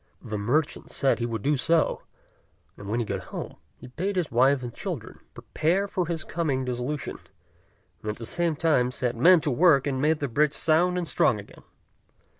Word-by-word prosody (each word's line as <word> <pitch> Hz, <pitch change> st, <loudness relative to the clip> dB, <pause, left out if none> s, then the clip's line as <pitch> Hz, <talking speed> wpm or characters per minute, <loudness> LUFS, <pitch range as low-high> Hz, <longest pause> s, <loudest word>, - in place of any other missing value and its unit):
The 110 Hz, -, -5 dB
merchant 145 Hz, +9 st, -1 dB
said 135 Hz, -, +1 dB
he 120 Hz, -, -1 dB
would 115 Hz, -3 st, -4 dB
do 145 Hz, +2 st, +2 dB
so; 165 Hz, +4 st, +1 dB, 0.7 s
and 100 Hz, -, -9 dB
when 115 Hz, +3 st, 0 dB
he 120 Hz, -, -1 dB
got -, -, -4 dB
home, -, -, -7 dB, 0.2 s
he -, -, -12 dB
bade 180 Hz, +11 st, -3 dB
his 180 Hz, -4 st, -1 dB
wife 130 Hz, +3 st, +3 dB
and 120 Hz, -1 st, -6 dB
children -, -, -6 dB, 0.2 s
prepare 185 Hz, +6 st, 0 dB
for 180 Hz, -3 st, -2 dB
his 165 Hz, -2 st, -3 dB
coming 145 Hz, -6 st, -2 dB
dissolution, 125 Hz, +4 st, -4 dB, 0.8 s
and 105 Hz, -, -5 dB
at 105 Hz, -, -3 dB
the 115 Hz, -, -7 dB
same 170 Hz, +5 st, 0 dB
time 145 Hz, -6 st, +2 dB
set 125 Hz, -1 st, -2 dB
men 170 Hz, +8 st, +6 dB
to 145 Hz, -, 0 dB
work 150 Hz, 0 st, +4 dB
and 135 Hz, -2 st, -1 dB
made 155 Hz, +2 st, +3 dB
the 140 Hz, -, -1 dB
bridge 145 Hz, +4 st, +1 dB
sound 175 Hz, +3 st, +2 dB
and 175 Hz, -2 st, -2 dB
strong 105 Hz, -, +2 dB
again. 100 Hz, -, -13 dB
140 Hz, 195 wpm, -26 LUFS, 125-165 Hz, 0.8 s, men